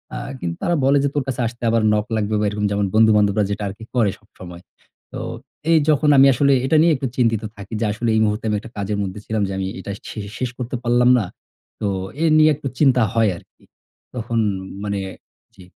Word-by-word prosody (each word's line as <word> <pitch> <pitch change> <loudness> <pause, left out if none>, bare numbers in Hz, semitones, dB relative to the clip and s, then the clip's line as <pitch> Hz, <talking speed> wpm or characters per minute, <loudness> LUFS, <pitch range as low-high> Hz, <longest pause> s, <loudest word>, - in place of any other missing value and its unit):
আ - - -3 0.2
কিন্তু 85 -4 -3
তারা 175 - +1
বলে 140 +1 +4
যে, - - +2
"তোর 145 - +1
কাছে 130 -2 -2
আসতে 120 +1 -9
আবার 115 0 +2
নক 105 0 0
লাগবে?" 105 0 -1
বা, 105 - +1
এরকম 105 0 -2
যেমন 100 0 +1
বন্ধু-বান্ধবরা 105 -2 +4
যেটা 105 +1 -3
আরকি 100 +3 -8
করে 110 -5 +3
সবসময়। 90 -5 -12 0.5
তো - - -5 0.5
এই 165 - +6
যখন 150 0 +3
আমি 135 +1 +8
আসলে 140 +2 +3
এটা 155 +4 +3
নিয়ে 170 -1 +4
একটু 130 0 -3
চিন্তিত 115 -3 +1
থাকি 100 +2 -10
যে, - - +2
আসলে 115 +2 -2
এই 110 - +3
মুহূর্তে 105 +1 -2
আমি 105 - +1
একটা 115 +2 -12
কাজের 100 +1 -2
মধ্যে 95 +1 -5
ছিলাম 110 -1 -1
যে - - -4
আমি 95 - -2
এটা 100 - -6 0.2
শে - - -7 0.2
শেষ 125 - -2
করতে 125 0 -4
পারলাম 120 0 +3
না। 105 - -2 0.6
তো 105 - 0 0.4
এ - - +3
নিয়ে 155 0 +6
একটু 140 - -6
চিন্তা 130 -4 +4
হয় 115 -2 +3
আরকি। - - -20 0.5
তখন 115 -1 -2 0.4
মানে 100 -1 -2 0.6
জি। 95 - -14
110 Hz, 215 wpm, -21 LUFS, 105-125 Hz, 0.6 s, আমি